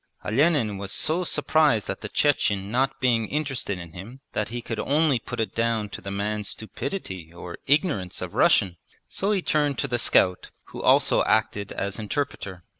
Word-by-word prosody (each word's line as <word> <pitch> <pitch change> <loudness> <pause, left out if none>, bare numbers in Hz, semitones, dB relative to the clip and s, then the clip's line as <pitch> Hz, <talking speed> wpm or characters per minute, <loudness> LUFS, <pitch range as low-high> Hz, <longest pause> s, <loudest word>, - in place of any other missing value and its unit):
Olenin 115 - +2
was 100 -1 -4
so 165 - +1
surprised 155 - +2
at - - -4
the 105 - -5
Chechen 100 -9 +1
not 135 +2 +1
being 120 -4 +2
interested 135 -9 -2
in 85 -2 -8
him 110 +9 -9
that 105 - -1
he 120 +1 -4
could 115 -1 -5
only 145 -1 +2
put - - -7
it 110 -4 -1
down 115 -2 0
to - - -8
the 100 - -6
man's 105 +1 -2
stupidity 95 - -6
or 85 0 -9
ignorance 140 - +1
of - - -6
Russian; 90 -3 +3 0.3
so 200 +2 -1
he 195 -4 +1
turned 145 -3 +1
to - - -1
the 120 -2 -1
scout, 90 -4 +3 0.2
who - - -7
also - - +4
acted 105 -2 +1
as 100 +1 -3
interpreter. 105 - -4
115 Hz, 180 wpm, -25 LUFS, 100-145 Hz, 0.3 s, also